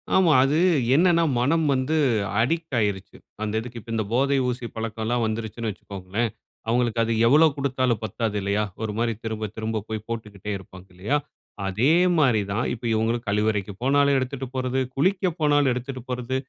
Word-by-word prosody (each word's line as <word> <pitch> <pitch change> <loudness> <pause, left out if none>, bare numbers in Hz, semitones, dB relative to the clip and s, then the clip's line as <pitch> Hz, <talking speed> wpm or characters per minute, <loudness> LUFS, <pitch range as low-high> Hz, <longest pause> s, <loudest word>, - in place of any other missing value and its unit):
ஆமா. 180 -4 +5
அது 140 +3 +2 0.4
என்னனா? 170 0 +4 0.2
மனம் 155 +6 +2
வந்து 130 +4 0 0.5
அடிக்ட் 160 +3 -1
ஆயிடுச்சு, 100 -3 -2 0.3
அந்த 105 0 -2
இதுக்கு. 120 +1 -7
இப்போ 115 - -10
இந்த 110 - 0
போதை 140 +2 +2
ஊசி 125 0 -4
பழக்கம் 110 0 -4
எல்லாம் 120 0 0
வந்துருச்சுன்னு 110 +1 -3
வச்சுக்கோங்களேன், 100 +4 -4 0.4
அவங்களுக்கு 120 -1 +1
அது 115 - -1 0.2
எவ்ளோ 155 +5 +6
கொடுத்தாலும் 130 -4 0
பத்தாது 110 0 -2
இல்லையா? 100 +2 0 0.2
ஒரு 110 -1 -2
மாரி 115 -1 +1
திரும்ப 110 -2 -3
திரும்ப 110 0 -2
போய் 110 -1 -4
போட்டுக்கிட்டே 105 -3 -6
இருப்பாங்க 95 -1 -14
இல்லையா? 105 +11 0 0.5
அதே 110 +10 +2 0.3
மாரி 125 -9 +4
தான். 110 +5 0
இப்ப 120 0 -9
இவங்களும் 115 +2 0
கழிவறைக்கு 105 -1 0
போனாலும் 140 +1 +3
எடுத்துட்டு 130 0 -3
போறது, 130 0 -1 0.2
குளிக்க 185 +6 +2
போனாலும் 145 -2 +3
எடுத்துட்டு 130 +1 -5
போறது. 125 0 -3
120 Hz, 160 wpm, -24 LUFS, 110-135 Hz, 0.5 s, எவ்ளோ